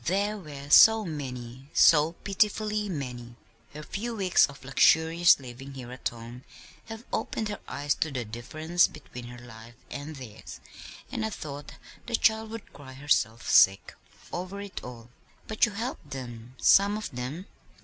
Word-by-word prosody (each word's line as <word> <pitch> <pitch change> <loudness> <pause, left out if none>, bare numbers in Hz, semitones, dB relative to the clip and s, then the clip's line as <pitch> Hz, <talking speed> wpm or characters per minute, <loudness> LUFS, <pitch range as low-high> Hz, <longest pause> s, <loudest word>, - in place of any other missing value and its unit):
There 200 +4 0
were 145 -4 -9
so 220 +4 +8
many, 130 -4 -7
so 155 +1 +6
pitifully 210 +1 0
many. 125 -7 -6 0.4
Her 150 - -7
few 230 +8 -4
weeks 190 -4 +4
of 140 -2 -13
luxurious 160 +6 +5
living 135 +1 -10
here 125 -2 -8
at 130 - -3
home 120 +2 -11 0.4
have 225 0 -9
opened 220 -1 -2
her 205 - -5
eyes 145 0 -1
to 160 - +1
the 130 -4 -4
difference 155 +10 0
between 125 -1 -11
her 120 0 -10
life 120 -1 -13 0.2
and 145 +2 -6
theirs, 125 -6 -10 0.5
and - - -3
I 220 - -1
thought 145 -7 -8 0.3
the 235 - 0
child 220 0 +2
would 225 -1 -9
cry 130 -2 -12
herself 130 -5 0
sick 95 +1 +5 0.4
over 185 +3 -5
it 200 -2 -7
all." 120 -1 -10 0.4
"But 220 +2 +2
you 210 - -7
helped 225 - -5
them 125 -3 -8
some 200 +1 +5
of 215 - -6
them?" 130 +8 -5
145 Hz, 160 wpm, -28 LUFS, 125-200 Hz, 0.5 s, so